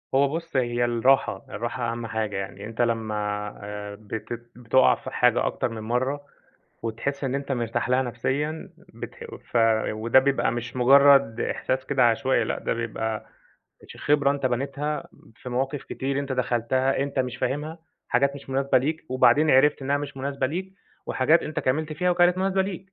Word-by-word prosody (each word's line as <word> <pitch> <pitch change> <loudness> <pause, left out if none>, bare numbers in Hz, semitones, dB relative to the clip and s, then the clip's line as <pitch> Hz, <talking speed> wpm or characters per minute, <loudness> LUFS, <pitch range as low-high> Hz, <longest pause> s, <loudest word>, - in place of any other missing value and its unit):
هو 140 +1 +5
بُص 165 -3 -6
هي 120 -1 +1
الراحة، 120 -3 +2
الراحة 120 +1 -3
أهم 115 0 -5
حاجة، 110 -2 -2
يعني 100 +1 -6
أنت 115 +2 -4
لمّا 115 -2 0 0.5
آآ 105 0 -6
بتت 115 +3 -7
بتُقع 125 +2 +4
في - - -8
حاجة 125 -1 +3
أكتر - - -1
من 115 -1 -7
مرّة 130 +5 -1 0.6
وتحس 140 +5 -3
إن 135 0 -1
أنت 140 0 -2
مرتاح 120 0 -1
لها 130 +1 +3
نفسيًا 135 +6 -3 0.2
بتح - - -9 0.3
ف - - -1 0.4
وده 115 +4 +3
بيبقى 135 -3 +2
مش 120 +1 -5
مجرد 135 -2 +6
إحساس 130 +1 -2
كده 135 -3 +2
عشوائي، 120 +1 +1
لأ، - - -2
ده - - -2
بيبقى 110 -1 -3 0.6
ش - - -11
خبرة 145 -1 +2
أنت 140 -2 0
بنيتها 140 +4 -2 0.3
في 125 - -9
مواقف 135 +3 -2
كتير 135 +1 -3
أنت 140 -1 -3
دخلتها 130 +2 0
أنت 140 0 -2
مش 130 -1 -1
فاهمها، 150 +6 -3 0.3
حاجات 140 +3 +2
مش 140 -1 -10
مناسبة 135 0 +2
ليك، 155 +6 -2
وبعدين 145 +4 +4
عرفت 135 +1 +4
إنها 140 +2 +1
مش 145 -1 -6
مناسبة 135 0 -2
ليك 190 +6 -5 0.3
وحاجات 155 +6 +3
أنت 155 - -3
كملت 155 +4 -1
فيها 180 +3 0
وكانت 175 +1 +3
مناسبة 190 0 +1
ليك. 190 0 -7
130 Hz, 170 wpm, -25 LUFS, 120-140 Hz, 0.6 s, مجرد